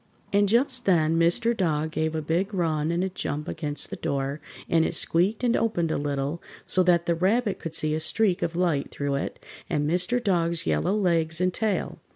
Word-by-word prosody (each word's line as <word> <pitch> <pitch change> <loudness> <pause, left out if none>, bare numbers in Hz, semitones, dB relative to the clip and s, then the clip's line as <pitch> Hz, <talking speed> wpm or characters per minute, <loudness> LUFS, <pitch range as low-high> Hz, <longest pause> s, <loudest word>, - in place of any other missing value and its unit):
And 205 0 +3
just 250 +2 +2
then 165 -3 +3
Mr. 175 +8 +2
Dog 160 -5 0
gave 160 0 -1
a 155 - -2
big 180 +7 -1
run 160 -3 0
and 170 +2 0
a 190 - -1
jump 150 -5 -4
against 150 -3 -3
the - - -3
door, 140 +1 -3 0.3
and 165 -1 +3
it - - -1
squeaked 190 +8 +1
and 240 -1 +3
opened 175 -8 0
a - - 0
little, 145 +2 -2 0.2
so 185 - +2
that 175 -1 +3
the 170 - +2
Rabbit 200 +6 +1
could 165 -1 -6
see 155 0 +1
a 155 - 0
streak 185 +3 +1
of 170 - -2
light 170 -6 0
through 140 -1 -3
it 140 - -3 0.3
and 145 0 0
Mr. 180 +8 +1
Dog's 170 -6 0
yellow 185 +4 +1
legs 165 -5 +1
and 180 0 +1
tail. 215 0 -2
170 Hz, 200 wpm, -26 LUFS, 155-190 Hz, 0.3 s, And